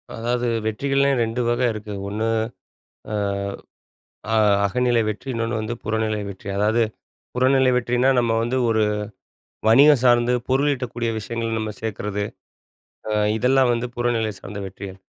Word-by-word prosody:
அதாவது 120 +1 -1 0.2
வெற்றிகள்லையே 140 +5 +1
2 115 +2 -2
வக 120 +1 0
இருக்கு. 105 -1 -7 0.2
1 110 +2 -2 0.9
அ, - - -2 1.2
அ - - +3 0.3
அகநிலை 120 +2 +2
வெற்றி, 110 +6 -6
இன்னொன்னு 115 0 -1
வந்து 110 +2 -3
புறநிலை 110 0 -1
வெற்றி. 95 +1 -10
அதாவது 110 +3 +2 0.5
புறநிலை 130 +1 +3
வெற்றினா, 125 +1 +1
நம்ம 115 -2 +2
வந்து 120 +3 -1
ஒரு 110 -1 +2 0.9
வணிகம் 140 +3 +7
சார்ந்து 120 0 +4 0.2
பொருளீட்டக்கூடிய 130 -4 0
விஷயங்கள 115 +1 -4
நம்ம 110 0 -3
சேக்குறது. 105 -1 -3 0.9
அ - - -1 0.3
இதெல்லாம் 130 +1 +3
வந்து 120 +1 -2
புறநிலை 120 -3 0
சார்ந்த 100 +1 -8
வெற்றிகள். 95 0 -8
115 Hz, 125 wpm, -22 LUFS, 110-125 Hz, 1.2 s, வணிகம்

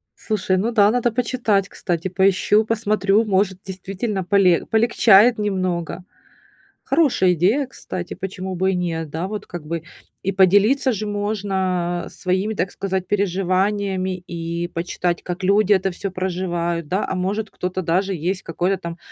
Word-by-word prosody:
Слушай, 205 -4 -1
ну 215 +6 0
да, 210 -3 +5
надо 240 0 +1
почитать, 225 -5 0
кстати, 175 -1 -3
поищу, 195 +3 +3
посмотрю, 215 -1 +2
может, 190 -2 +1
действительно, 195 +1 -4
поле 185 -3 +3
полегчает 225 0 +5
немного. 185 -4 -2 0.8
Хорошая 265 - +3
идея, 210 - +2
кстати, 180 -9 -6
почему 190 0 -5
бы 190 +2 +1
и - - -1
нет, 165 -3 -2
да, 165 +4 -3
вот, 210 0 -5
как 175 -3 -8
бы. 165 +1 -4 0.4
И 195 - 0
поделиться 205 +9 +4
же 215 +1 -3
можно 190 -4 -1
своими, 190 +3 -1
так 180 0 -1
сказать, 190 -2 -3
переживаниями 190 0 0
и 170 0 -4
почитать, 175 0 -2
как 180 +1 -5
люди 200 +2 +3
это 190 0 +1
всё 195 +3 -4
проживают, 175 -3 -2
да. 190 +6 0
А, - - -2
может, 200 +4 -2
кто-то 185 +1 -3
даже 185 +4 +1
есть 180 +4 -2
какой-то 180 +3 -1
там 170 0 -6
190 Hz, 150 wpm, -21 LUFS, 180-205 Hz, 0.8 s, да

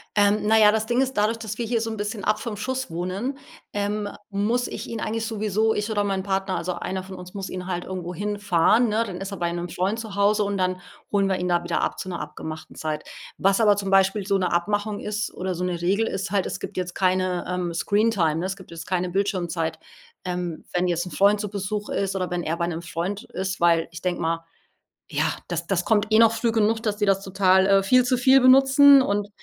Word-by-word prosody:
Ähm, 205 0 +4
na 220 +1 +4
ja, 210 -1 +7
das 220 0 0
Ding 245 +2 +2
ist, 265 0 -1
dadurch, 215 +2 +1
dass 220 -2 -6
wir 235 - -1
hier 230 0 0
so 225 - -2
'n 220 - -5
bisschen 205 -1 -4
ab 215 0 +1
vom 215 -4 -5
Schuss 260 +2 -3
wohnen, 185 +11 -3 0.4
ähm, 205 0 -2 0.2
muss 225 +5 0
ich - - -6
ihn 230 -1 -4
eigentlich 225 +1 -2
sowieso 215 0 0
ich 210 +1 -2
oder 205 -1 +1
mein 195 -2 -1
Partner 195 -1 -1
also 180 +1 -2
einer 185 +1 -4
von 190 0 -9
uns 180 +1 -10
muss 195 -1 -5
ihn 185 0 -6
halt 175 -1 -3
irgendwo 180 -1 -5
hinfahren, 205 +2 +2
ne? 220 +2 +1
Dann 185 -4 -6
ist 195 +1 -5
er 200 - -5
bei 170 0 -1
'nem 175 0 -4
Freund 195 +7 -1
zu 220 -3 -7
Hause 205 +1 +3
und 200 0 -2
dann 185 -1 -1 0.3
holen 200 -1 +2
wir 190 - +1
ihn 180 - -2
da 175 0 +2
wieder 175 - -1
ab - - -2
zu 185 - -5
'ner 175 - -4
abgemachten 155 0 -8
Zeit. 155 -1 -3 0.3
Was 195 +3 +2
aber 205 -2 +5
zum 195 -1 -3
Beispiel 195 +1 +3
so 195 -1 +2
'ne 185 - -1
Abmachung 205 +4 -1
ist 210 0 -3
oder 185 0 -3
so 180 - -4
'ne 175 -2 -2
Regel 200 +6 +1
ist 195 0 -3
halt: 200 -3 +1
Es - - -5
gibt - - -7
jetzt 180 -1 -3
keine, 185 -1 +1
ähm, 180 -2 -2
Screentime, 200 -4 +1
ne? 175 - -2
Es 190 0 -2
gibt 190 -3 -15
jetzt 165 0 -8
keine 180 -1 -1
Bildschirmzeit, 175 -4 -1 0.5
ähm, 180 -3 -4
wenn 180 0 +1
jetzt 175 0 0
'n 180 - -8
Freund 200 +1 +3
zu 210 -2 -3
Besuch 205 +1 -4
ist 195 -1 -1
oder 185 -1 -2
wenn 175 0 -1
er 165 +2 -2
bei 170 - 0
'nem 165 -1 -4
Freund 175 +4 -4
ist, 190 0 -4
weil 170 -1 +3
ich 165 - -9
denke 180 -1 -2
mal 165 0 0 0.7
ja, - - 0 0.2
das - - -3
das 180 -2 0
kommt 215 -1 +2
eh 220 - +5
noch 225 -1 +6
früh 230 0 0
genug, 220 0 +2
dass 215 -3 -1
die 205 - +1
das 195 0 +2
total 190 0 +3
äh, 195 0 +4
viel 250 +5 +4
zu 250 0 +2
viel 265 +2 +6
benutzen. 270 +2 +7
Und 205 -3 0
195 Hz, 245 wpm, -24 LUFS, 180-215 Hz, 0.7 s, ja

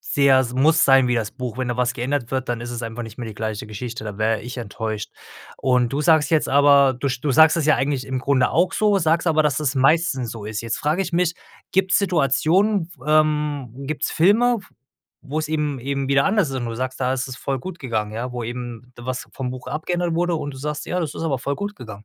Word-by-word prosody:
sehr 140 -2 +3
es 125 -1 -3
muss 155 +5 +4
sein 135 -2 +5
wie 125 - +2
das 110 -2 -2
Buch, 125 -2 -6
wenn 130 -1 -2
da 120 - -2
was 125 -1 +1
geändert 125 0 -2
wird, 130 -1 -2
dann 120 -1 -2
ist 120 0 -6
es 120 0 -5
einfach 115 +1 -5
nicht 115 +2 -11
mehr 120 - -5
die 110 - -8
gleiche 110 -1 -4
Geschichte, 115 +1 -6
da 105 -2 -6
wäre 110 0 +1
ich 125 +2 -7
enttäuscht. 110 -1 -4 0.5
Und 125 -2 +1
du 140 - 0
sagst 155 -1 +3
jetzt 160 -2 +2
aber, 140 -1 +5
du 135 +3 -2
sch 125 -1 -3
du 145 - -1
sagst 160 +3 +6
es 155 - 0
ja 155 - +5
eigentlich 140 -1 -1
im 130 -1 -2
Grunde 130 -1 +2
auch 180 +3 +2
so, 210 -2 +2
sagst 165 0 +1
aber, 155 -1 +3
dass 150 0 +1
es 140 -2 0
meistens 135 -3 +2
so 110 -3 -8
ist. 110 +1 -4
Jetzt 115 -1 -3
frage 155 +6 0
ich 180 -2 -6
mich: 175 -1 +1 0.4
„Gibt's 190 0 +3
Situationen, 180 - +2 0.2
ähm, 150 -4 +1 0.2
gibt's 155 0 -2
Filme, 230 +8 +4
f - - -18 0.6
wo's 155 +2 -2
eben 150 -4 -1
eben 140 +1 -2
wieder 140 0 +3
anders 205 -4 +2
sind 130 -2 -3
und 115 - -3
du 115 - -5
sagst: 130 +2 -4
'Da 130 0 +1
isses 130 0 -3
voll 135 -1 -3
gut 180 +5 -8
gegangen'. 110 -5 -2
Ja, 125 +3 -4
wo 120 -2 -4
eben, 120 0 -7
was 125 +1 -5
vom 130 -2 -4
Buch 130 0 -8
abgeändert 175 +2 -2
wurde 175 0 +1
und 145 -2 -5
du 130 - -9
sagst: 150 +1 -4
'Ja, 180 - -1
das 155 -3 -3
ist - - -5
aber 145 -5 0
voll 140 +2 -2
gut 205 +1 -4
gegangen'?“ 110 -4 -10
135 Hz, 245 wpm, -22 LUFS, 120-155 Hz, 0.6 s, sagst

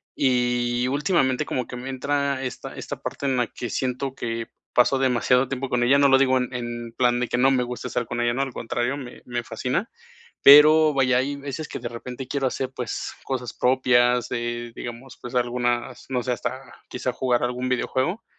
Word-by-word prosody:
y 125 -1 +1
últimamente 135 -2 +1
como 125 -2 -3
que - - -7
me 125 +2 -6
entra 140 +1 -1
esta 125 - -6
esta - - -6
parte - - -5
en 130 -2 +1
la 120 -1 +1
que 120 - -6
siento 130 +3 -2
que 115 -2 -4 0.3
paso 125 +2 +4
demasiado 125 0 +2
tiempo 135 0 -4
con 125 -1 +1
ella, 135 +3 +5
no 140 0 +5
lo 135 - +6
digo 130 -1 +3
en 125 0 -2
en 120 -1 -5
plan 120 -1 +3
de 125 - 0
que - - 0
no 130 +2 +5
me 130 -2 +2
gusta 125 0 -5
estar 125 - -2
con 120 - -4
ella, 120 0 +1
¿no?, 130 - -1
al 135 -2 -2
contrario, 120 +4 -2
me 125 -3 -9
me 120 -1 -3
fascina. 130 - -2 0.5
Pero, 150 +2 +8
vaya, 130 -2 +3
hay 140 +3 -1
veces 140 +2 -6
que - - -5
de 120 -2 -5
repente 125 +2 -7
quiero 135 0 -1
hacer, 130 0 -2
pues, 125 - -4
cosas 125 -3 -3
propias, 125 -1 +3
eh, 120 0 -3
digamos, 120 +2 -8
pues, 125 - -8
algunas, 120 0 -1
no 125 -2 -1
sé, 125 - -1
hasta 130 +2 -5 0.2
quizá 125 0 -3
jugar 125 -2 0
algún 125 +1 -1
videojuego, 130 - -1
125 Hz, 200 wpm, -24 LUFS, 120-135 Hz, 0.5 s, Pero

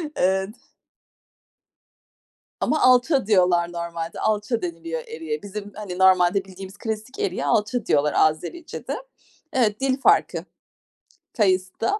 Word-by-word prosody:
Evet. 190 +2 +1 2.1
Ama 310 - +1
"alça" 255 +2 +4
diyorlar 180 -4 +3
normalde, 170 -1 -5
"alça" 215 +2 0
deniliyor 165 -2 -4
eriğe. 155 -1 -5
Bizim, 205 0 -7
hani, 200 -4 -6
normalde 190 +1 +4
bildiğimiz 190 +1 -10
klasik 220 +3 -5
eriğe 180 -6 -1
"alça" 210 - +1
diyorlar 150 0 +2
Azericede. 175 - -1 0.6
Evet, 215 -5 +1
dil 265 -1 +1
farkı. - - +3 0.9
Kayısı 185 -3 +1
da 410 - +1
190 Hz, 110 wpm, -23 LUFS, 170-220 Hz, 2.1 s, alça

